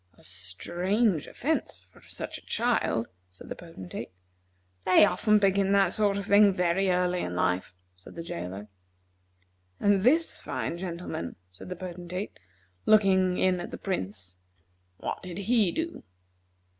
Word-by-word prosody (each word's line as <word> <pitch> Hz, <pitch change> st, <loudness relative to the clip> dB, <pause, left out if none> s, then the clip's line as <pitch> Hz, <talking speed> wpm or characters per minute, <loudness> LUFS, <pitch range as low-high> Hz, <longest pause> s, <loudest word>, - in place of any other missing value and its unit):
"A -, -, -21 dB
strange 175 Hz, -, -1 dB
offence 310 Hz, +5 st, -2 dB
for -, -, -19 dB
such -, -, -5 dB
a -, -, -24 dB
child," 230 Hz, -, +1 dB, 0.2 s
said 90 Hz, -, -13 dB
the -, -, -4 dB
Potentate. 165 Hz, -, -8 dB, 0.7 s
"They 185 Hz, +3 st, +7 dB
often 215 Hz, +1 st, +3 dB
begin 195 Hz, -1 st, +3 dB
that 195 Hz, -2 st, +4 dB
sort 205 Hz, -2 st, +2 dB
of 200 Hz, -, -3 dB
thing 200 Hz, 0 st, +6 dB
very 180 Hz, +2 st, +2 dB
early 180 Hz, 0 st, +2 dB
in 90 Hz, -, -3 dB
life," 90 Hz, 0 st, 0 dB, 0.2 s
said 90 Hz, -, -13 dB
the 165 Hz, -, -5 dB
jailer. 95 Hz, -, -6 dB, 1.1 s
"And 200 Hz, -1 st, +3 dB
this 315 Hz, -, +3 dB
fine 170 Hz, -, -3 dB
gentleman," 170 Hz, -, -5 dB, 0.2 s
said 95 Hz, -, -11 dB
the 180 Hz, -, -4 dB
Potentate, 180 Hz, +2 st, -6 dB, 0.5 s
looking 190 Hz, -4 st, +4 dB
in 185 Hz, -1 st, +2 dB
at 175 Hz, -, -5 dB
the -, -, -6 dB
Prince, 95 Hz, -, -4 dB, 0.6 s
"what -, -, -4 dB
did 180 Hz, -2 st, -7 dB
he 210 Hz, -2 st, +2 dB
do?" 330 Hz, +1 st, -3 dB
185 Hz, 145 wpm, -28 LUFS, 155-200 Hz, 1.1 s, They